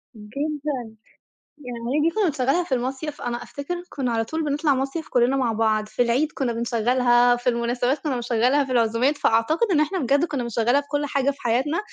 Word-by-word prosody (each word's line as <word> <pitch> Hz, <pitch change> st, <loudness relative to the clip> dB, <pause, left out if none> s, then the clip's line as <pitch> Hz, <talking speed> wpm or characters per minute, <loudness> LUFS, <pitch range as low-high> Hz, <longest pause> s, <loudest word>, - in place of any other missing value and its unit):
جدًا. 275 Hz, +2 st, -4 dB, 0.7 s
يعني 250 Hz, +2 st, -3 dB
دي 330 Hz, -, +3 dB
كُنّا 430 Hz, -, +2 dB
بنشغّلها 285 Hz, +1 st, +1 dB
في 280 Hz, -6 st, -1 dB
المصيف. 265 Hz, +4 st, -4 dB
أنا 240 Hz, 0 st, -3 dB
أفتكر 345 Hz, +5 st, -6 dB
كُنّا 260 Hz, -4 st, -2 dB
على 225 Hz, -1 st, 0 dB
طول 320 Hz, +6 st, -3 dB
بنطلَع 290 Hz, 0 st, +1 dB
مصيف 275 Hz, +5 st, -3 dB
كُلّنا 245 Hz, +2 st, +2 dB
مع 255 Hz, -4 st, +1 dB
بعض. 215 Hz, -1 st, +1 dB
في 245 Hz, -, -3 dB
العيد 255 Hz, +6 st, +2 dB
كُنّا 245 Hz, -4 st, -2 dB
بنشغّلها، 240 Hz, +1 st, +3 dB
في 245 Hz, +1 st, -7 dB
المناسبات 245 Hz, +3 st, 0 dB
كُنّا 275 Hz, -2 st, -2 dB
بنشغّلها، 245 Hz, +4 st, +2 dB
في 270 Hz, -, -7 dB
العزومات، 240 Hz, +4 st, +2 dB
فأعتقد 310 Hz, -, +2 dB
إن 305 Hz, -, +3 dB
إحنا 315 Hz, +5 st, 0 dB
بجد 280 Hz, +3 st, +2 dB
كُنّا 280 Hz, -7 st, -3 dB
بنشغّلها 235 Hz, +4 st, +1 dB
في 285 Hz, -, -20 dB
كل 290 Hz, 0 st, 0 dB
حاجة 280 Hz, 0 st, 0 dB
في 280 Hz, -, -15 dB
حياتنا، 265 Hz, -, 0 dB
260 Hz, 190 wpm, -23 LUFS, 240-290 Hz, 0.7 s, دي